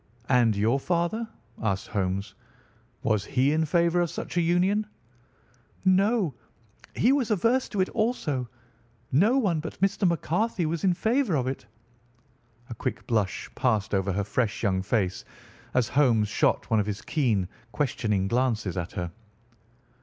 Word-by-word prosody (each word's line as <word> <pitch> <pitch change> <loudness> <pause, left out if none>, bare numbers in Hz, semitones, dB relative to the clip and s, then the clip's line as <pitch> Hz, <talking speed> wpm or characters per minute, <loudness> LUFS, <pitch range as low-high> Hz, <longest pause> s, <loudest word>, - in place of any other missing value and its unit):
"And 120 -4 +4
your 110 +7 +2
father?" 175 +9 -1 0.3
asked 100 -4 -1
Holmes. 100 -1 -2 0.7
"Was 105 -3 +1
he 130 +6 +1
in 160 +1 +2
favour 170 +2 +2
of 175 - 0
such 175 - -6
a 175 - +3
union?" 185 +5 +2 1.0
"No, 195 - +3 0.6
he 245 - +4
was 270 -5 +1
averse 230 +5 +2
to 205 - 0
it 185 - +1
also. 155 - -1 0.6
No 205 - +4
one 190 -11 +1
but 160 +1 -7
Mr. 195 0 +2
McCarthy 175 +3 0
was 160 0 -2
in 185 -2 +3
favour 225 - +1
of 130 -3 0
it." 130 -3 -4 1.0
A - - -2
quick 115 - -4
blush 105 -5 -1
passed 110 -6 0
over 95 0 +1
her 100 +2 0
fresh 115 +3 -1
young 95 -3 +1
face 95 -2 -1 0.5
as 125 -3 +3
Holmes 120 -7 +3
shot 105 - +1
one 110 - +4
of 105 - 0
his 105 0 -4
keen, 115 - +1 0.2
questioning 110 -6 0
glances 115 -5 0
at 85 -1 -4
her. 90 -2 -4
135 Hz, 150 wpm, -27 LUFS, -, 1.0 s, And